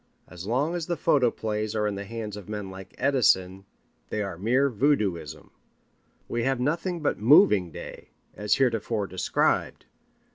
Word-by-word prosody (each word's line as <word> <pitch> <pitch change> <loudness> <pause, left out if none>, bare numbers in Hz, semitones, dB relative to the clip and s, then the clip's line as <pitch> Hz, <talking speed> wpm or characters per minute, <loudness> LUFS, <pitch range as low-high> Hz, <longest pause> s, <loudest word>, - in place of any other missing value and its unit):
As 90 +2 -9
long 135 +8 0
as 175 -2 -3
the 175 -2 -1
photoplays 110 -7 0
are 105 -1 0
in 105 - 0
the 100 +1 -6
hands 110 -1 -6
of 105 -1 -10
men 105 -3 -5
like 95 0 -11
Edison 95 -8 +2 0.4
they 105 - -2
are 100 -3 -5
mere 120 +10 +2
voodooism. 100 - -1 0.8
We 120 - -2
have 135 +1 0
nothing 165 +6 -1
but 150 - -1
Moving 110 - +5
Day, - - -10 0.3
as 105 0 +1
heretofore 115 -4 0
described. 95 0 0
110 Hz, 150 wpm, -26 LUFS, 95-135 Hz, 0.8 s, Moving